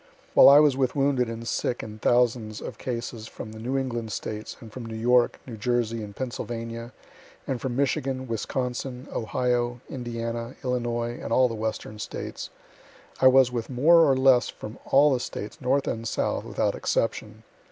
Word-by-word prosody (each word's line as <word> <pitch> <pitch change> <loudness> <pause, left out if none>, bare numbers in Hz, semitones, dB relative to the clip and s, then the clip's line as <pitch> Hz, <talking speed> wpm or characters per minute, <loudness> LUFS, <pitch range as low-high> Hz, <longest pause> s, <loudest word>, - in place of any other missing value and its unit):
While - - +9
I 140 +1 +9
was 150 -3 +5
with 130 -2 0
wounded 135 -4 +2
and 115 0 -6
sick 120 - -1
in 110 0 -8
thousands 120 -3 +1
of - - -8
cases 115 -2 -5
from 110 - -8
the 110 - -10
New 125 +4 -2
England 120 -4 -3
States, 110 0 -5
and 115 -4 -12
from 120 -3 -7
New 110 - -6
York, 120 +1 +3
New 120 -4 -8
Jersey, 115 0 0
and 100 -1 -8
Pennsylvania, 115 -1 -5 0.5
and 130 -3 -3
from 130 -3 -3
Michigan, 130 -1 -1
Wisconsin, 125 +3 -3
Ohio, 120 +1 0
Indiana, 115 -1 -4
Illinois, 120 -1 -2
and - - -6
all 130 +2 +5
the 115 - -5
Western 110 -1 -4
States, - - -6 0.7
I 130 - +6
was 130 -1 +6
with 120 -2 -3
more 150 +7 +5
or 135 - +2
less 130 -2 +5
from 105 +3 -9
all 145 +1 +5
the 125 - 0
States, 105 -3 -6
North 135 +2 +1
and 115 0 -2
South, - - -1
without - - 0
exception. 110 -1 -2
120 Hz, 175 wpm, -26 LUFS, 115-130 Hz, 0.7 s, While